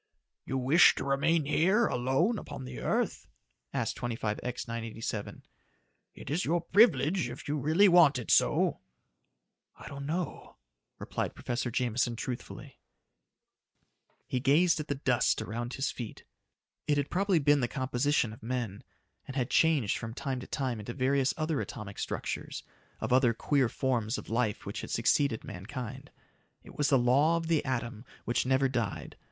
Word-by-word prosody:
"You 135 - -1
wish 135 +7 +6
to - - -3
remain 145 +3 +1
here 190 +10 +3
alone 135 - +1
upon 130 - -8
the 125 -1 -7
earth?" - - -1 0.4
asked - - -2
25X 120 +1 -3
987. 115 -2 -5 0.7
"It - - -8
is 170 +5 0
your 175 +2 +1
privilege 170 - +3
if 120 +6 -9
you 145 - -1
really 160 +9 +4
want 170 -7 +6
it 125 - -3
so." - - +3 1.0
"I - - -11
don't 140 0 -7
know," 170 +3 -4 0.4
replied - - -4
Professor 120 -1 -3
Jameson 120 -1 0
truthfully. 120 +2 -7 1.5
He 130 - -2
gazed 155 +6 +3
at 150 - -4
the 145 - -1
dust 130 -3 +1
around 120 +3 -4
his 135 - -1
feet. 120 -4 -8 0.6
It 145 - +2
had 145 0 -1
probably 195 0 +2
been 145 -1 +4
the 120 - +1
composition 130 -2 0
of 110 - -14
men, 115 -4 -4 0.4
and 135 - -7
had 130 -2 -1
changed 155 -10 +3
from 115 0 -6
time 135 -2 -3
to 125 - -9
time 130 -5 -2
into 110 +3 -6
various 135 0 +2
other 155 -2 -1
atomic 105 -6 -7
structures - - -4 0.4
of - - 0
other 125 -3 +4
queer 135 -1 +1
forms 120 -3 -1
of - - -9
life 115 -2 -1
which - - -5
had - - -8
succeeded 140 -6 +1
mankind. 125 +7 -7 0.5
It - - -14
was 145 - +1
the 135 - +5
law 140 +7 +3
of 165 - -3
the 165 -2 +1
atom 120 -3 -3 0.2
which 120 +1 0
never 135 +1 +3
died. 120 -6 -3
130 Hz, 160 wpm, -30 LUFS, 120-150 Hz, 1.5 s, wish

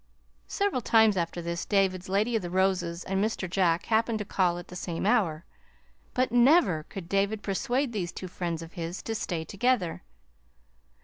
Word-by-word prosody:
Several 400 - 0
times 220 -2 +4
after 170 -1 -2
this 170 +1 -3
David's 190 -3 +1
Lady 210 +5 +1
of 220 - +1
the 175 - -5
Roses 180 -2 0
and 195 +1 0
Mr. 215 -3 -2
Jack 175 -1 +1
happened 225 0 +1
to 210 - -4
call 180 -3 +1
at 175 - -8
the 180 - -9
same 175 -1 -4
hour; 170 -6 +1 0.7
but 255 -2 +1
never 245 - +5
could 190 -4 -7
David 200 +3 0
persuade 245 +6 -1
these 180 -5 -2
two 185 - -7
friends 170 -2 -4
of 165 - -12
his 170 +1 -5
to 225 - -3
stay 175 -7 -3
together. 200 -2 0
190 Hz, 175 wpm, -28 LUFS, 175-220 Hz, 0.7 s, never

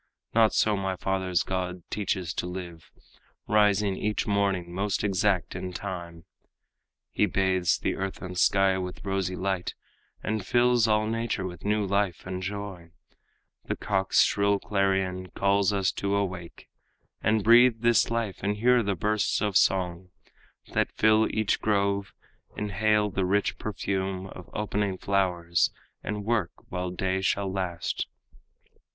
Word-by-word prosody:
Not 110 -1 +5
so 105 -1 +3
my 95 -1 -2
father's 95 -1 0
god 90 -1 -3
teaches 95 -4 -2
to 90 - -3
live. 90 -2 -8 0.6
Rising 105 -2 +3
each 105 0 -1
morning 100 -4 0
most 100 +2 -1
exact 100 -2 +1
in 90 0 -5
time, 85 -3 -6 0.9
He - - +2
bathes 95 -2 +1
the - - -1
earth 95 0 -4
and 90 0 -7
sky 95 +1 +3
with 90 +1 -6
rosy 95 -2 -1
light 95 -2 -2 0.5
And 110 -2 -2
fills 120 +2 +3
all 105 0 +2
nature 115 -3 -2
with 90 -2 -7
new 105 0 +1
life 100 -2 0
and 90 0 -4
joy; 95 -3 -6 0.8
The - - -2
cock's 95 -2 +2
shrill 100 0 +2
clarion 95 -2 0
calls 100 0 +2
us 95 -2 +1
to 100 0 -1
awake 90 -4 -4 0.5
And 110 -1 +2
breathe 120 +1 +6
this 120 -1 +4
life 115 -4 -2
and 105 +2 -1
hear 125 +2 +4
the 100 -3 -1
bursts 105 +4 0
of 105 -2 -1
song 90 -2 +2 0.6
That - - +1
fill 110 0 +4
each 110 -2 0
grove, 100 -1 +1 0.5
inhale 105 0 +1
the 95 +1 -1
rich 100 +2 0
perfume 95 -2 -3
Of 90 -2 -11
opening 105 -2 -1
flowers, 90 -4 +1 0.3
and 105 -1 -4
work 110 -6 0 0.2
while 90 0 -3
day 95 +1 -1
shall 95 0 0
last. 90 -4 -2
95 Hz, 140 wpm, -27 LUFS, 95-105 Hz, 0.9 s, breathe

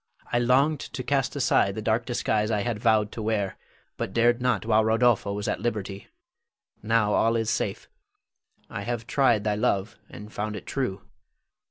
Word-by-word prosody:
I 120 - +3
longed 135 +5 +3
to 135 -2 -6
cast 140 0 0
aside 120 -7 +2
the 110 - -4
dark 115 +2 0
disguise 110 -3 0
I 105 -2 0
had 115 -1 -2
vowed 110 -3 +2
to 115 - -6
wear, 105 -3 -1 0.4
but 95 - -4
dared 120 +1 +3
not 125 -3 +1
while 110 -1 +3
Rodolpho 110 -2 +2
was 100 0 -3
at - - -1
liberty. 100 -4 -4 0.7
Now 110 -1 +2
all 115 +1 +3
is 115 -1 0
safe. 105 -3 -2 0.8
I - - -6
have 115 +1 -3
tried 120 -5 +2
thy 105 0 +1
love, 105 0 -1
and 105 +1 -11
found 105 +1 -3
it 100 - -8
true. 115 -8 -3
110 Hz, 175 wpm, -26 LUFS, 105-120 Hz, 0.8 s, I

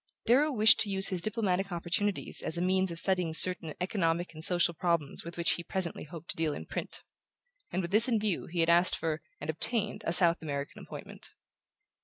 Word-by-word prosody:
Darrow 285 +6 +2
wished 220 -4 +4
to 215 - +5
use 195 0 +1
his 185 -2 -3
diplomatic 195 -2 -2
opportunities 180 +4 -1
as 160 - +1
a - - -3
means 185 +1 0
of 170 - -4
studying 180 -2 0
certain 175 -3 +4
economic 175 -3 -2
and 155 0 -6
social 175 0 +3
problems 170 -4 -3
with 170 +1 -10
which 170 - 0
he 170 - -4
presently 180 -3 -2
hoped 165 +2 -8
to - - -8
deal 160 -2 -2
in - - -9
print; - - -6 0.7
and 185 +1 -3
with 170 - -6
this 220 +4 +8
in 230 -4 0
view 210 -4 -3
he 170 0 -3
had 165 - 0
asked 175 +2 +4
for, 160 -1 -4 0.2
and 150 +2 -4
obtained, 210 +6 -1
a - - 0
South 170 -1 +5
American 140 -2 -7
appointment. - - -11
175 Hz, 205 wpm, -28 LUFS, 165-195 Hz, 0.7 s, this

